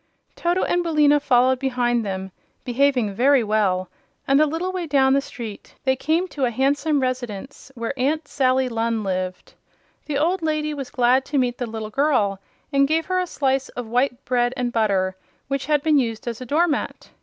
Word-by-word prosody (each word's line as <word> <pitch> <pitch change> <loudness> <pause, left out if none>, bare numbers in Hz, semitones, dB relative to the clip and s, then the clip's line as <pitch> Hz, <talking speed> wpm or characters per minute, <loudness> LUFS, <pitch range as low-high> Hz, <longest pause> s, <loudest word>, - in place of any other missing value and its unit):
Toto 350 +2 0
and 350 - +1
Billina 300 -3 +3
followed 255 -2 +3
behind 245 -3 0
them, 190 -1 -4 0.3
behaving 250 -4 +1
very 260 +4 +4
well, 200 -4 +1 0.4
and 275 +2 +4
a 310 - +4
little 330 +5 -2
way 365 -3 -4
down 270 -2 +3
the 275 - +3
street 230 -6 -9
they 265 -1 +2
came 320 +7 0
to 275 -5 -1
a - - +1
handsome 285 +5 +1
residence 255 0 -4
where 235 +2 -3
Aunt 285 +4 -1
Sally 260 -2 +1
Lunn 230 -2 -1
lived. 185 -1 -4 0.5
The 295 -2 -1
old 345 +5 +1
lady 305 -1 -1
was 275 -3 -6
glad 250 +1 +3
to 290 - -2
meet 245 -2 0
the 245 - -2
little 220 -1 -6
girl 220 -8 +1 0.3
and 275 0 +4
gave 320 +2 +1
her 370 0 0
a 365 - -1
slice 270 -4 0
of 245 - -6
white 245 +3 -1
bread 245 0 +1
and 245 -1 -2
butter 195 -4 +1 0.3
which 275 0 -2
had 295 -2 +2
been 305 -2 +4
used 230 -2 -3
as 235 0 -4
a 255 - -7
door 320 +7 +3
mat. 290 -3 -3
260 Hz, 190 wpm, -22 LUFS, 235-290 Hz, 0.5 s, very